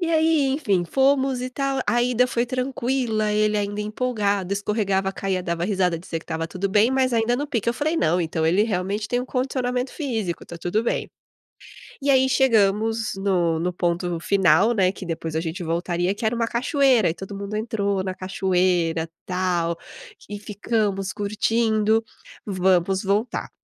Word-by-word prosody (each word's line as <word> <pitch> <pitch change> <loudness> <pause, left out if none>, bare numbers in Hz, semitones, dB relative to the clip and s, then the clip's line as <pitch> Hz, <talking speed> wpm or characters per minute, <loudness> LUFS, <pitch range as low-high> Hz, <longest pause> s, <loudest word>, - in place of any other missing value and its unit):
E 345 - -1
aí, 315 -3 +3
enfim, 220 - +1
fomos 265 +2 +2
e 255 - -4
tal, 275 +1 -1
a 240 - +2
ida 250 0 +3
foi 240 0 0
tranquila, 250 -4 -1
ele 210 0 +2
ainda 205 0 -2
empolgado, 210 -4 -1
escorregava, 200 -2 0
caía, 190 -2 -2
dava 170 -1 -2
risada, 185 -4 +1
dizia 165 -2 -5
que - - -18
estava 165 0 -3
tudo 185 +4 -3
bem, 210 +4 +4
mas 260 -1 +1
ainda 230 +1 +2
no 285 +3 -3
pique. 235 -4 -1
Eu 235 - +1
falei: 310 +5 -1
"Não, 175 - +2
ele 165 +4 +1
realmente 205 0 -2
tem 245 0 0
um 255 - -5
condicionamento 255 -1 -1
físico, 225 - -3
tá 170 - -8
tudo 195 +7 -1
bem". - - -1 0.9
E 280 - -1
aí, 265 -1 +5
chegamos 225 -3 +2
no 180 -4 +1
no 180 +2 -1
ponto 175 -1 -1
final, 190 +4 +3
né, 190 -3 +3
que 190 - -9
depois 165 -1 -4
a - - +2
gente 170 +2 -4
voltaria, 175 +3 -1
que 220 - -5
era 230 +2 +1
1 230 -1 0
cachoeira 255 - +3
e - - -1
todo 195 +2 -8
mundo 200 +1 -5
entrou 200 -3 -1
na 185 -1 -4
cachoeira 180 -3 0 0.2
tal 180 -2 0 0.5
e 205 0 -6
ficamos 205 -2 -2
curtindo, 220 +1 +1 0.4
vamos 190 0 +1
voltar. 205 +5 -1
205 Hz, 170 wpm, -23 LUFS, 185-240 Hz, 0.9 s, aí